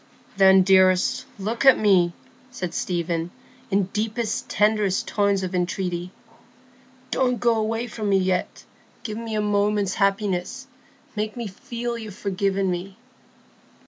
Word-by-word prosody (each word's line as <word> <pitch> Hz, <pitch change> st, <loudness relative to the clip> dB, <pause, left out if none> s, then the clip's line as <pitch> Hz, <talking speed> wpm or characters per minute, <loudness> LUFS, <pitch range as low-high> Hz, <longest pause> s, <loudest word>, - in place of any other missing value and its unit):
"Then, 190 Hz, -1 st, +6 dB
dearest, 185 Hz, -1 st, +3 dB
look 215 Hz, +5 st, -3 dB
at 270 Hz, -1 st, +7 dB
me," 185 Hz, -5 st, +3 dB, 0.4 s
said 185 Hz, -9 st, -5 dB
Stephen, 175 Hz, -7 st, -2 dB, 0.4 s
in 200 Hz, +1 st, +2 dB
deepest, 220 Hz, +1 st, -2 dB
tenderest 210 Hz, -2 st, +1 dB
tones 200 Hz, -2 st, +1 dB
of 185 Hz, 0 st, -4 dB
entreaty. 180 Hz, 0 st, -2 dB, 1.0 s
"Don't 250 Hz, -2 st, +1 dB
go 235 Hz, -1 st, +3 dB
away 225 Hz, +2 st, -1 dB
from 215 Hz, -3 st, -4 dB
me 195 Hz, -, +4 dB
yet. 185 Hz, -1 st, -1 dB, 0.4 s
Give 215 Hz, 0 st, -5 dB
me 225 Hz, -1 st, -5 dB
a 210 Hz, -, +1 dB
moment's 205 Hz, -1 st, +1 dB
happiness; 195 Hz, +4 st, -1 dB, 0.5 s
make 215 Hz, +2 st, -3 dB
me 235 Hz, -, -4 dB
feel 235 Hz, +4 st, -5 dB
you've 215 Hz, -4 st, -8 dB
forgiven 195 Hz, -1 st, -1 dB
me." 185 Hz, +2 st, -5 dB
200 Hz, 130 wpm, -23 LUFS, 185-220 Hz, 1.0 s, at